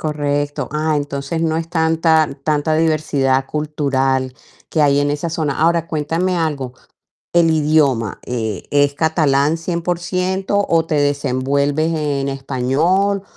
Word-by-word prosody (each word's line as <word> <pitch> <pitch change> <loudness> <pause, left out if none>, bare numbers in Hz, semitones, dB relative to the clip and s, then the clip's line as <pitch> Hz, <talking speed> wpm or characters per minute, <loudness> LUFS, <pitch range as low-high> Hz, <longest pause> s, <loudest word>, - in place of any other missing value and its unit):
Correcto. 145 -2 -2
Ah, 155 +1 0
entonces 145 +2 -3
no 160 -1 0
es 165 0 -3
tanta, 160 -2 +2 0.2
tanta 155 0 +1
diversidad 145 -4 +1
cultural 135 -3 -1 0.4
que 160 - 0
hay 145 -1 +4
en 145 0 +1
esa 145 +3 -2
zona. 155 -4 -2
Ahora 165 0 +2
cuéntame 165 +4 -1
algo, 145 -6 -2 0.6
el 170 -1 +4
idioma, 150 -8 +1
eh, 110 -6 -3
¿es 145 0 +2
catalán 150 -1 +2
100%? 180 +3 -2
o, 165 -1 +3
¿te 160 - -2
desenvuelves 145 +2 0
en 145 -3 -1
español?, 140 +9 0
150 Hz, 125 wpm, -18 LUFS, 140-165 Hz, 0.6 s, hay